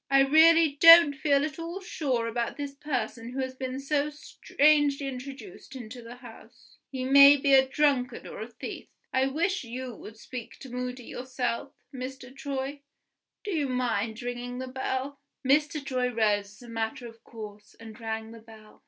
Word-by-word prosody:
I 275 0 +5
really 315 +1 +5
don't 330 -3 +10
feel 280 +1 +2
at 305 0 -7
all 335 +3 -5
sure 275 -10 -2
about 235 0 -3
this 285 -1 -5
person 250 -5 -4
who 270 - -4
has 260 -1 -3
been 260 0 -5
so 285 +1 0
strangely 290 -1 +1
introduced 275 +4 -8
into 245 -1 -9
the 235 +1 -10
house 245 -2 -16
he 260 -2 -4
may 280 +2 +8
be 275 0 +2
a 265 0 +6
drunkard 265 -4 0
or - - -8
a 220 - -5
thief. 240 - -8 0.3
I 260 +1 +2
wish 340 +7 -1
you 250 +1 -6
would 220 0 -12
speak 240 +1 -9
to 260 - -10
Moody 250 0 -5
yourself, 255 +1 -4 0.2
Mr. 260 0 -8
Troy. 275 0 -4 0.6
Do 410 - -4
you 300 -6 -1
mind 235 -3 -1
ringing 245 0 -5
the 260 0 -5
bell?" 260 +1 -3 0.3
Mr. 295 +1 +2
Troy 255 -2 0
rose, 210 -3 +1
as 205 +4 -16
a - - -12
matter 225 +1 -4
of 230 0 -15
course, 210 -2 -11
and 220 -1 -11
rang 220 -1 -5
the 230 - -11
bell. 220 -1 -16
260 Hz, 175 wpm, -27 LUFS, 235-280 Hz, 0.6 s, don't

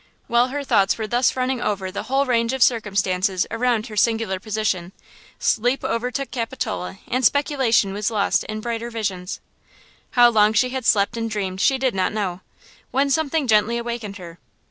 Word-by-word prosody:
While 240 +1 +3
her 285 +2 -4
thoughts 195 -7 +2
were 220 - -3
thus 240 +3 +1
running 255 -1 -1
over 195 -4 -2
the 200 - -4
whole 270 +1 +2
range 235 -1 +1
of 265 -2 +3
circumstances 195 -4 +1
around 230 -1 0
her 215 - -9
singular 220 -3 +1
position, 200 -4 -2 0.4
sleep 245 +4 +1
overtook 250 +4 -2
Capitola 230 -6 -4
and 255 +2 -1
speculation 255 -7 +2
was 205 +2 -1
lost 210 -3 +1
in 215 0 -5
brighter 235 0 -3
visions. 195 -5 -4 0.8
How 240 0 +7
long 215 -1 +4
she 250 +4 +2
had 260 -1 -3
slept 205 +2 +3
and 230 0 -2
dreamed 195 -3 -3
she 270 - +3
did 260 -1 0
not 185 0 0
know, 190 -4 -3 0.5
when 275 +1 +1
something 315 0 +1
gently 220 0 +3
awakened 235 -3 -5
her. 170 -2 -11
225 Hz, 170 wpm, -22 LUFS, 200-250 Hz, 0.8 s, How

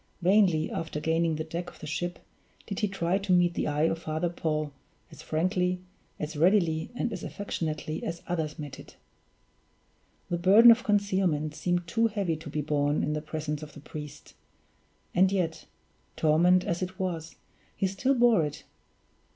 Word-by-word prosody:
Vainly, 180 -4 +4
after 160 -2 -3
gaining 160 +1 +1
the 155 - -3
deck 170 +2 -5
of - - -17
the - - -8
ship, 175 +3 -3 0.5
did 200 - -4
he 210 - +1
try 190 -1 0
to 195 -1 -3
meet 175 -1 +4
the - - -1
eye 150 0 0
of 165 0 +1
Father 160 +1 -2
Paul 155 -3 -2 0.4
as - - -12
frankly, 180 +2 0 0.4
as 155 +1 -4
readily, 165 -1 +2
and 240 -1 -2
as 185 - -6
affectionately 155 -5 -4
as 170 0 -4
others 160 -4 -2
met 145 -3 -7
it. - - -13 1.4
The 175 - 0
burden 210 +7 +8
of 230 +2 +3
concealment 190 -8 +1
seemed 175 +3 -1
too 230 +6 +2
heavy 200 -6 -1
to 155 0 -9
be 150 +1 -2
borne 145 0 +1
in 150 - 0
the 150 - -2
presence 155 -1 -4
of 150 -1 -9
the - - -11
priest 150 0 -9 0.8
and 185 +2 +4
yet, 175 -5 -2 0.5
torment 175 +4 +4
as 170 -1 -2
it 185 0 -4
was, 170 -4 -3 0.4
he - - 0
still 195 +9 +1
bore 235 -8 +5
it! 150 - -5
170 Hz, 170 wpm, -28 LUFS, 155-185 Hz, 1.4 s, burden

